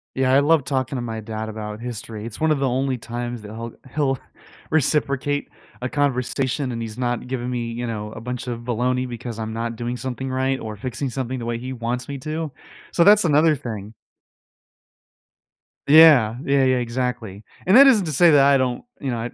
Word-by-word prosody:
Yeah, 130 Hz, -1 st, +2 dB
I 135 Hz, -, +6 dB
love 150 Hz, +1 st, +3 dB
talking 130 Hz, -1 st, -2 dB
to 125 Hz, -, -2 dB
my 115 Hz, -2 st, -4 dB
dad 110 Hz, 0 st, -5 dB
about 105 Hz, 0 st, -6 dB
history, 115 Hz, -2 st, -6 dB
it's 115 Hz, -2 st, -8 dB
one 160 Hz, -, +2 dB
of 150 Hz, -2 st, +2 dB
the 135 Hz, -1 st, +1 dB
only 130 Hz, +1 st, 0 dB
times 120 Hz, 0 st, -5 dB
that 105 Hz, 0 st, -10 dB
he'll 115 Hz, +1 st, -7 dB, 0.2 s
he'll 140 Hz, -3 st, +1 dB, 0.5 s
reciprocate 145 Hz, -2 st, +1 dB, 0.3 s
a 125 Hz, -, -2 dB
conversation, 135 Hz, -1 st, -1 dB
and 115 Hz, -1 st, -4 dB
he's 110 Hz, -1 st, -6 dB
not 120 Hz, -1 st, -2 dB
giving 125 Hz, -1 st, -3 dB
me, 120 Hz, -2 st, -3 dB
you 120 Hz, +1 st, -4 dB
know, 105 Hz, -2 st, -5 dB
a -, -, -8 dB
bunch 125 Hz, +2 st, -5 dB
of 120 Hz, -2 st, -3 dB
baloney 125 Hz, +2 st, -1 dB
because 120 Hz, -1 st, -6 dB
I'm 110 Hz, 0 st, -4 dB
not 115 Hz, +1 st, -3 dB
doing 120 Hz, +2 st, -4 dB
something 130 Hz, +1 st, -4 dB
right 130 Hz, +1 st, 0 dB
or 110 Hz, -4 st, -7 dB
fixing 130 Hz, +5 st, -4 dB
something 130 Hz, 0 st, -3 dB
the 120 Hz, -, -5 dB
way 120 Hz, 0 st, -2 dB
he 130 Hz, +2 st, -6 dB
wants 120 Hz, +1 st, -3 dB
me 140 Hz, -, -5 dB
to, 155 Hz, +3 st, -4 dB, 0.4 s
so 170 Hz, -, +4 dB
that's 205 Hz, +1 st, +6 dB
another 155 Hz, 0 st, +4 dB
thing. 110 Hz, -4 st, -7 dB, 1.9 s
Yeah, 145 Hz, -7 st, +7 dB
yeah, 140 Hz, -1 st, +2 dB
yeah, 130 Hz, -1 st, +3 dB
exactly, 120 Hz, -4 st, -3 dB, 0.2 s
and 190 Hz, +6 st, +7 dB
that 275 Hz, -, +10 dB
isn't 230 Hz, -9 st, +5 dB
to 155 Hz, -, -2 dB
say 165 Hz, +4 st, +5 dB
that 145 Hz, -2 st, +6 dB
I 140 Hz, 0 st, +5 dB
don't, 125 Hz, -2 st, -1 dB, 0.2 s
you 135 Hz, -3 st, -3 dB
know, 120 Hz, -, -2 dB
I 115 Hz, +2 st, -3 dB
125 Hz, 205 wpm, -22 LUFS, 115-140 Hz, 1.9 s, that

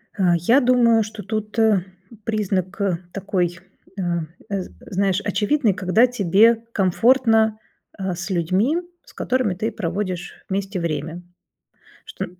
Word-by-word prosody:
А, 180 Hz, -3 st, +3 dB
я 230 Hz, +11 st, +4 dB
думаю, 240 Hz, -3 st, +4 dB
что 215 Hz, -1 st, -8 dB
тут 215 Hz, 0 st, -4 dB, 0.7 s
признак 200 Hz, -3 st, -2 dB, 0.3 s
такой, 185 Hz, -2 st, -2 dB, 0.4 s
а, 175 Hz, -2 st, -1 dB, 0.3 s
з 195 Hz, -3 st, -3 dB
знаешь, 195 Hz, 0 st, 0 dB
очевидный, 210 Hz, +3 st, +1 dB
когда 185 Hz, +7 st, +3 dB
тебе 225 Hz, +1 st, +3 dB
комфортно, 220 Hz, +2 st, +3 dB, 0.4 s
а, 190 Hz, -2 st, -2 dB
с 175 Hz, 0 st, -6 dB
людьми, 190 Hz, -, +1 dB, 0.3 s
с -, -, -18 dB
которыми 255 Hz, -7 st, 0 dB
ты 215 Hz, +5 st, -2 dB
проводишь 185 Hz, -2 st, -4 dB
вместе 195 Hz, 0 st, -2 dB
время, 165 Hz, +1 st, -3 dB, 0.8 s
што 445 Hz, -, -5 dB
200 Hz, 115 wpm, -22 LUFS, 180-225 Hz, 0.8 s, я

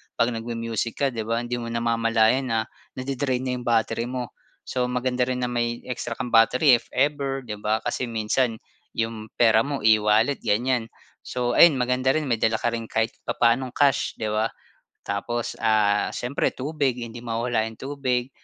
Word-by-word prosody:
'pag 115 Hz, +1 st, +2 dB
nagmu-music 115 Hz, -1 st, -3 dB
ka, 140 Hz, -, 0 dB
'di 110 Hz, -2 st, -5 dB
ba, 115 Hz, +1 st, 0 dB
hindi 120 Hz, 0 st, -3 dB
mo 115 Hz, -, -5 dB
namamalayan 115 Hz, +2 st, +2 dB
na 115 Hz, -1 st, +1 dB, 0.4 s
nadi-drain 130 Hz, -1 st, -2 dB
na 130 Hz, -, -2 dB
yung 120 Hz, -, -9 dB
battery 115 Hz, 0 st, +1 dB
mo. 125 Hz, -1 st, -4 dB, 0.3 s
So 125 Hz, -1 st, -1 dB
maganda 125 Hz, 0 st, 0 dB
rin 125 Hz, -1 st, -2 dB
na 125 Hz, -, -1 dB
may 120 Hz, 0 st, -2 dB
extra 120 Hz, -1 st, -4 dB
kang 125 Hz, -1 st, -5 dB
battery 125 Hz, +3 st, +5 dB
if 115 Hz, -, -21 dB
ever 135 Hz, 0 st, 0 dB
'di 105 Hz, -4 st, -6 dB
ba 110 Hz, +1 st, 0 dB
kasi 125 Hz, -, -2 dB
minsan 115 Hz, +1 st, 0 dB, 0.4 s
yung 115 Hz, -1 st, -3 dB
pera 110 Hz, -2 st, +5 dB
mo 140 Hz, -3 st, -3 dB
e-wallet 110 Hz, +4 st, +4 dB
ganyan. 115 Hz, +2 st, +1 dB, 0.4 s
So, 125 Hz, -1 st, -1 dB
ayun 170 Hz, -3 st, +8 dB
maganda 130 Hz, +1 st, +1 dB
rin 155 Hz, -3 st, -1 dB
may 115 Hz, -, +2 dB
dala 110 Hz, -, +2 dB
ka 120 Hz, -, 0 dB
rin 115 Hz, -1 st, -4 dB
kahit 115 Hz, 0 st, 0 dB, 0.2 s
papaanong 120 Hz, +2 st, +1 dB
cash, 140 Hz, -2 st, +2 dB
di 110 Hz, -, -3 dB
ba? 110 Hz, +1 st, +1 dB, 0.6 s
Tapos 115 Hz, +4 st, -3 dB
ah 105 Hz, -2 st, +2 dB
siyempre 125 Hz, +3 st, -1 dB
tubig 140 Hz, -1 st, -1 dB
hindi 120 Hz, 0 st, -7 dB
mawawala 115 Hz, -1 st, -1 dB
yung 110 Hz, -, -7 dB
tubig 130 Hz, -2 st, -2 dB
120 Hz, 175 wpm, -24 LUFS, 115-130 Hz, 0.6 s, ayun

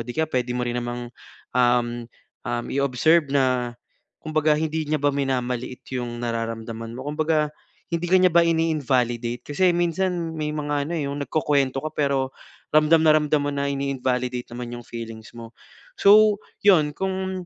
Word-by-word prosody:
'di 120 Hz, -, -6 dB
kaya 160 Hz, -1 st, +1 dB
puwede 125 Hz, -3 st, -1 dB
mo 125 Hz, -, -2 dB
rin 120 Hz, 0 st, -2 dB
namang, 120 Hz, 0 st, -4 dB, 0.5 s
um, 120 Hz, -1 st, +2 dB, 0.4 s
um, 120 Hz, 0 st, -2 dB
i-observe 140 Hz, +3 st, +2 dB
na 130 Hz, -3 st, +1 dB, 0.5 s
kumbaga 155 Hz, -1 st, +1 dB
hindi 160 Hz, 0 st, -1 dB
niya 150 Hz, +1 st, 0 dB
ba 145 Hz, -, +3 dB
minamaliit 125 Hz, -2 st, -2 dB
yung 120 Hz, -1 st, -4 dB
nararamdaman 115 Hz, -1 st, -4 dB
mo, 130 Hz, +4 st, -6 dB
kumbaga 155 Hz, 0 st, +1 dB, 0.4 s
hindi 170 Hz, 0 st, -2 dB
ka 185 Hz, -, +6 dB
niya 185 Hz, -2 st, +4 dB
ba 170 Hz, -, +7 dB
ini-invalidate? 130 Hz, -8 st, 0 dB
Kasi 180 Hz, +5 st, +2 dB
minsan 175 Hz, -1 st, -1 dB
may 150 Hz, -1 st, -2 dB
mga 145 Hz, -1 st, -1 dB
ano, 170 Hz, -, -4 dB
eh, 145 Hz, -, -2 dB
yung 140 Hz, 0 st, -3 dB
nagkukuwento 140 Hz, -3 st, 0 dB
ka -, -, -3 dB
pero 140 Hz, -2 st, 0 dB, 0.4 s
ramdam 155 Hz, +2 st, +6 dB
na 155 Hz, -, +7 dB
ramdam 150 Hz, -1 st, +2 dB
mo -, -, 0 dB
na 140 Hz, 0 st, -1 dB
in-invalidate 125 Hz, -3 st, -2 dB
naman 120 Hz, 0 st, -6 dB
yung 120 Hz, -, -8 dB
feelings 115 Hz, -1 st, -8 dB
mo. 115 Hz, -1 st, -11 dB, 0.4 s
So, 210 Hz, +1 st, +5 dB, 0.2 s
'yon 155 Hz, -7 st, +6 dB
kung 190 Hz, -1 st, -3 dB
140 Hz, 160 wpm, -23 LUFS, 120-155 Hz, 0.5 s, ba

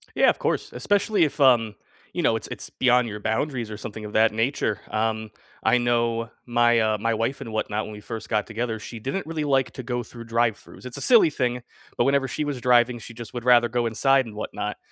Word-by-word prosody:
Yeah, -, -, +5 dB
of -, -, -3 dB
course. -, -, -1 dB
Especially 205 Hz, -2 st, +2 dB
if, 150 Hz, 0 st, -3 dB
um, 120 Hz, -5 st, +4 dB, 0.4 s
you -, -, -2 dB
know, -, -, +3 dB
it's -, -, -6 dB
it's -, -, -7 dB
beyond 125 Hz, -1 st, +3 dB
your 105 Hz, -1 st, -6 dB
boundaries 115 Hz, +2 st, -2 dB
or 105 Hz, -, -5 dB
something 110 Hz, 0 st, -7 dB
of 105 Hz, -, -7 dB
that 110 Hz, 0 st, +4 dB
nature, 115 Hz, -2 st, -1 dB
um, 110 Hz, 0 st, -1 dB, 0.3 s
I -, -, +4 dB
know 115 Hz, -1 st, 0 dB, 0.2 s
my 120 Hz, -1 st, +3 dB
uh, 110 Hz, -1 st, +2 dB
my 115 Hz, +2 st, -1 dB
wife 115 Hz, +5 st, -2 dB
and 115 Hz, -, -7 dB
whatnot, 110 Hz, -1 st, -2 dB
when 110 Hz, -, -8 dB
we 105 Hz, -, -9 dB
first 110 Hz, +1 st, -7 dB
got 105 Hz, -2 st, +1 dB
together, 115 Hz, 0 st, -3 dB
she 115 Hz, +2 st, -8 dB
didn't 135 Hz, -, -4 dB
really 160 Hz, -1 st, -3 dB
like 135 Hz, -2 st, +1 dB
to 130 Hz, -, -7 dB
go 120 Hz, 0 st, -2 dB
through 115 Hz, +1 st, -11 dB
drive-throughs. 115 Hz, +1 st, -2 dB
It's 125 Hz, +1 st, -6 dB
a 140 Hz, -, -5 dB
silly 230 Hz, -9 st, +6 dB
thing, 125 Hz, -4 st, -1 dB, 0.4 s
but -, -, +4 dB
whenever 140 Hz, -1 st, +2 dB
she 150 Hz, +4 st, -3 dB
was 140 Hz, -4 st, -4 dB
driving, 120 Hz, -1 st, +4 dB
she 115 Hz, +1 st, -10 dB
just 115 Hz, 0 st, -10 dB
would 120 Hz, -, -5 dB
rather 120 Hz, -1 st, +5 dB
go 120 Hz, 0 st, 0 dB
inside 135 Hz, +4 st, +3 dB
and 110 Hz, -3 st, -10 dB
whatnot. 105 Hz, -, -4 dB
120 Hz, 230 wpm, -24 LUFS, 110-130 Hz, 0.4 s, silly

